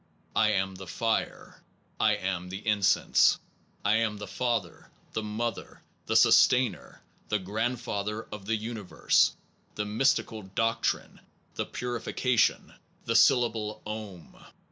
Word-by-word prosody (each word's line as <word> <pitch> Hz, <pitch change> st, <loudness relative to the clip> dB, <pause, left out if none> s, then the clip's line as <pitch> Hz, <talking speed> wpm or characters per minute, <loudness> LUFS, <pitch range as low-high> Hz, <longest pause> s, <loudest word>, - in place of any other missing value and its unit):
I 110 Hz, -1 st, +4 dB
am 95 Hz, -1 st, 0 dB
the 95 Hz, 0 st, -10 dB
fire. 115 Hz, +4 st, -2 dB, 0.4 s
I -, -, +4 dB
am 90 Hz, -1 st, -3 dB
the 95 Hz, +3 st, -7 dB
incense. 105 Hz, -2 st, +4 dB, 0.5 s
I 105 Hz, +2 st, +4 dB
am 110 Hz, -2 st, 0 dB
the 105 Hz, -, -6 dB
father, 105 Hz, -2 st, -3 dB, 0.2 s
the 110 Hz, -, -1 dB
mother, 110 Hz, +2 st, -4 dB, 0.2 s
the -, -, 0 dB
sustainer, 125 Hz, -3 st, +4 dB, 0.3 s
the 105 Hz, -, +2 dB
grandfather 105 Hz, +1 st, -3 dB
of 105 Hz, -2 st, -8 dB
the 115 Hz, -, +1 dB
universe 110 Hz, -2 st, +1 dB, 0.4 s
the 105 Hz, -, -2 dB
mystic 130 Hz, +6 st, +1 dB, 0.3 s
doc 115 Hz, 0 st, +1 dB
trine, -, -, -2 dB, 0.3 s
the -, -, -3 dB
purification, 125 Hz, 0 st, 0 dB, 0.3 s
the 115 Hz, -, -1 dB
syllable 110 Hz, -2 st, +3 dB
"Om". 105 Hz, -6 st, -8 dB
110 Hz, 120 wpm, -28 LUFS, 100-115 Hz, 0.5 s, I